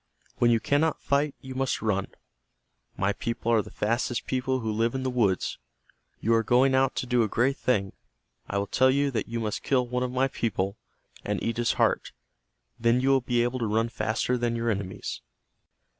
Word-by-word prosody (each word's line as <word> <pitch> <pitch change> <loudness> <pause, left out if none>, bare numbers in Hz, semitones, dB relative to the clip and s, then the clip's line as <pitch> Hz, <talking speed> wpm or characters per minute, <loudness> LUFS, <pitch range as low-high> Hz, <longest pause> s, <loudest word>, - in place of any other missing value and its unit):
When 120 - +4
you 115 -1 +4
cannot 145 +6 +1
fight 140 +1 +1
you 130 0 -8
must 135 0 -1
run. 100 -3 0 0.9
My 100 +1 +1
people 115 0 -2
are 115 -2 +4
the - - -11
fastest 120 +2 -1
people 130 0 -1
who 110 -1 -2
live 115 +3 0
in 130 - -2
the 130 - -1
woods. 105 -7 0 0.6
You 115 - +1
are 115 - +4
going 125 +4 +3
out 130 0 +2
to - - -2
do 125 -1 +2
a 110 - +2
great 130 +6 +1
thing. 100 -6 0 0.6
I 100 - -1
will 100 - 0
tell 130 +6 +3
you 140 +1 +2
that 110 -5 -2
you 115 0 -3
must 110 -2 -2
kill 125 -3 +1
one 125 +1 -2
of 125 - 0
my 130 +1 +2
people, 100 -6 -2 0.5
and - - -1
eat 115 - -1
his 120 -1 +1
heart. - - +1 0.7
Then 115 +1 +3
you 130 +2 +1
will 135 -1 +4
be 120 -1 +1
able 120 +1 -1
to 115 - -1
run 110 +2 +1
faster 120 +2 -1
than 120 -1 0
your 115 0 0
enemies." 100 -2 -4
120 Hz, 205 wpm, -27 LUFS, 110-130 Hz, 0.9 s, When